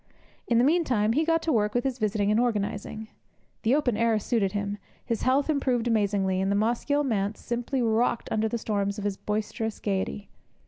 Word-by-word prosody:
In 235 - +3
the 240 - +5
meantime 255 -9 +2
he 305 +6 +2
got 330 0 +1
to 325 - 0
work 210 -1 +1
with 245 - +2
his 265 -2 -2
visiting 210 -1 +1
and 215 - +3
organizing. 215 -1 -2 0.5
The 240 +4 +3
open 270 -6 +1
air 230 0 +2
suited 210 -2 0
him, 205 0 -3 0.3
his 230 -3 -2
health 265 +2 +2
improved 260 -6 +1
amazingly, 200 -4 +1
and 195 +1 0
the - - +2
Mosgiel 240 +7 +1
Manse 210 -5 -1
simply 245 +2 -2
rocked 230 +1 +1
under 220 0 +1
the 235 - -1
storms 200 -2 -1
of 205 - -5
his 205 -1 -1
boisterous 215 +1 -3
gaiety. 95 -8 -3
220 Hz, 190 wpm, -27 LUFS, 205-245 Hz, 0.5 s, the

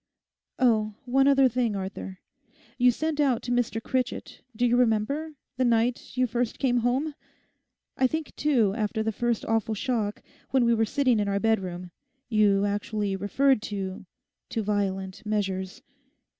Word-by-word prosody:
'Oh, 215 -5 +2
one 270 +2 +3
other 275 -1 +6
thing, 240 -3 0
Arthur. 190 -1 -6 0.6
You 250 +1 +6
sent 310 +5 -1
out 265 -5 +2
to 245 - -4
Mr 245 -2 0
Critchett—do 250 -1 -3
you 240 0 +3
remember?—the 255 +5 -1
night 240 +1 0
you 255 - +3
first 240 0 -2
came 245 -2 +1
home. 255 +6 0 0.8
I 260 - +4
think, 315 +2 -4
too, 245 -10 +2
after 220 0 -1
the 220 - 0
first 235 +1 -1
awful 225 -1 0
shock, 215 -3 -2 0.3
when 260 -2 +3
we 235 - +4
were 225 -1 +2
sitting 255 -1 +2
in 205 - 0
our 200 0 0
bedroom, 185 -5 -1 0.4
you 205 -3 +3
actually 205 0 -1
referred 235 +6 +2
to—to 195 +1 -6
violent 195 -1 -2
measures. 195 -3 -2
225 Hz, 145 wpm, -26 LUFS, 205-250 Hz, 0.8 s, other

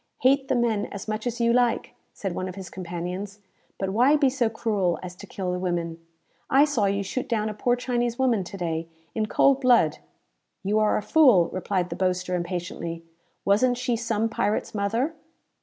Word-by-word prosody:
"Hate 270 +1 +4
the - - +1
men 230 -4 +1
as 200 +1 -8
much 215 +2 -2
as 240 0 -3
you 235 0 +3
like," 245 -1 +1 0.2
said 195 -3 -4
one 185 +1 -3
of 185 - -8
his 190 -3 -8
companions, 180 +3 -5 0.4
"but 195 -1 -2
why 250 +8 +4
be 280 -3 +3
so 250 -4 +1
cruel 205 -6 0
as 180 -1 -7
to - - -11
kill 185 -2 -3
the 180 - -2
women? 170 -2 -2 0.5
I 275 +2 +6
saw 275 -9 +1
you 200 0 0
shoot 250 +6 -4
down 215 -2 0
a - - -4
poor 245 +4 +1
Chinese 240 -1 -1
woman 245 -7 +2
to 195 - -8
day, 165 -2 -2 0.3
in 215 -1 -1
cold 275 +4 +3
blood!" 235 - +4 0.6
"You 205 +3 +1
are 215 -1 +3
a - - -3
fool!" 245 - +5
replied 185 -1 -1
the - - -2
boaster, 180 -1 -1
impatiently. 170 -1 -4 0.4
"Wasn't 240 +5 +3
she 250 -1 0
some 225 -1 0
pirate's 215 -1 -1
mother?" 225 +9 0
210 Hz, 190 wpm, -25 LUFS, 185-245 Hz, 0.6 s, I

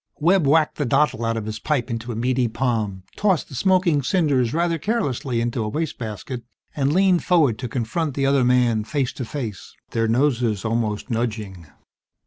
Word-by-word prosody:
Webb 170 0 +3
whacked 155 +2 +3
the 145 - 0
dottle 135 -2 +2
out 115 0 0
of 110 - -4
his 110 0 -5
pipe 135 -3 -1
into 115 +1 -4
a - - -5
meaty 125 +2 +1
palm, 110 -5 -2
tossed 195 -5 +1
the - - -11
smoking 180 0 +2
cinders 140 -6 +1
rather 170 +1 0
carelessly 140 - -1
into 120 0 -1
a 105 - -2
waste 160 +8 -3
basket, 115 +2 -5 0.3
and 140 -1 +1
leaned 185 +1 +3
forward 150 -11 +3
to 125 - -3
confront 135 +6 -2
the 140 - 0
other 135 -1 +3
man 120 -3 +3
face 130 +3 -2
to 130 - -5
face, 115 -7 -6 0.2
their 115 -1 +1
noses 120 -4 +1
almost 110 +1 -1
nudging. 105 -7 -3
125 Hz, 180 wpm, -22 LUFS, 115-150 Hz, 0.3 s, Webb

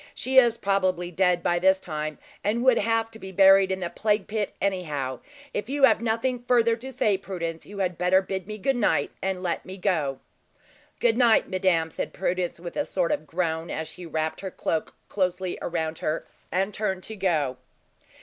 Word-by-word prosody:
She 260 +1 -1
is 235 -2 +3
probably 185 -3 0
dead 180 -1 +2
by 175 0 +2
this 190 +1 +4
time, 155 -4 -4 0.3
and 225 +4 0
would 255 -2 +5
have 225 +1 +1
to 220 - -11
be 190 -2 -8
buried 195 0 +6
in 190 0 -2
the 175 - -2
plague 210 -2 +1
pit, 210 -1 -3
anyhow. 150 -10 -2 0.3
If 210 - -3
you 285 0 -1
have 270 - +6
nothing 235 +2 0
further 235 -2 +4
to 260 +3 -8
say, 210 -6 +1
Prudence, 170 -4 -5
you 205 - -10
had 185 -3 -1
better 180 +1 +4
bid 190 0 -4
me 215 0 -5
good 270 +7 0
night, 240 - +1
and 190 -1 -2
let 175 -2 -1
me 185 +1 -8
go." 160 -8 0 0.8
"Good 235 0 +2
night, 235 -3 +4
madame!" 180 -4 +1
said - - -4
Prudence, 180 -2 -2
with 170 0 -7
a 290 - +1
sort 180 -3 0
of 155 - -2
groan, 165 -1 -2
as 160 0 -3
she 180 -1 -9
wrapped 160 0 -2
her 195 - -4
cloak 160 -3 -3
closely 185 -2 -1
around 160 -2 -2
her, 155 +1 -2 0.3
and 195 +3 0
turned 190 -3 -2
to 220 - -5
go. 155 -10 0
190 Hz, 195 wpm, -26 LUFS, 170-215 Hz, 0.8 s, buried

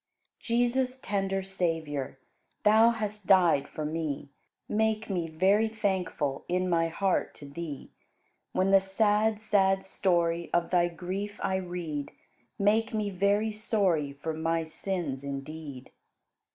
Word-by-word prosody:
103. 230 - +2
Jesus, 255 +2 +1
tender 195 -3 -1
Savior, 160 -8 -2 0.5
Thou 220 +2 +6
hast 210 -3 -4
died 175 -8 +5
for 155 - -5
me; 150 -3 -3 0.4
Make 220 0 0
me 175 -3 -1
very 195 +7 +3
thankful 190 -10 -1
In 180 +1 0
my 165 -2 +2
heart 190 +3 0
to 145 - -11
Thee. 145 0 -7 0.6
When 190 +1 +1
the 195 - +8
sad, 210 +2 +2
sad 195 -3 +2
story 170 -3 0
Of 175 0 +1
Thy 175 -1 +4
grief 190 +4 -5
I 190 - +1
read, 175 -6 -4 0.5
Make 220 +3 +2
me 210 -2 -1
very 200 +3 +2
sorry 195 -9 0
For 155 +3 -4
my 165 +1 0
sins 160 -4 -4
indeed. 140 -1 -7
185 Hz, 130 wpm, -29 LUFS, 160-205 Hz, 0.6 s, the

